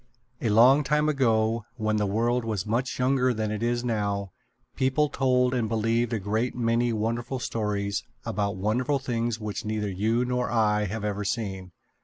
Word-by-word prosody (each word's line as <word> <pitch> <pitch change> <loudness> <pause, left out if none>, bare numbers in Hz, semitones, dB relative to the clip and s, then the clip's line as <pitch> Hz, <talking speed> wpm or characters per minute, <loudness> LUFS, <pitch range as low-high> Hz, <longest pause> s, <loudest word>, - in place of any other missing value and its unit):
A 115 - 0
long 125 +7 +6
time 150 +2 +1
ago, 115 -5 +2
when 110 -1 0
the 105 -1 +1
world 120 +4 +1
was 110 -5 -2
much 120 +4 -1
younger 125 -1 +2
than 110 -1 -2
it 110 0 -3
is 120 +1 0
now, 100 -4 -1 0.4
people 135 +3 +2
told 125 -2 +2
and 115 -4 0
believed 115 +1 +1
a 115 - 0
great 110 +5 -1
many 120 0 +1
wonderful 115 +4 -2
stories 105 -4 -2 0.2
about 100 -1 -1
wonderful 120 +9 0
things 120 -4 -2
which 105 +1 -4
neither 105 -2 -2
you 110 +6 +1
nor 125 0 -1
I 105 -2 +2
have 105 +2 -4
ever 105 0 -2
seen. 95 -4 -3
115 Hz, 170 wpm, -26 LUFS, 105-125 Hz, 0.4 s, long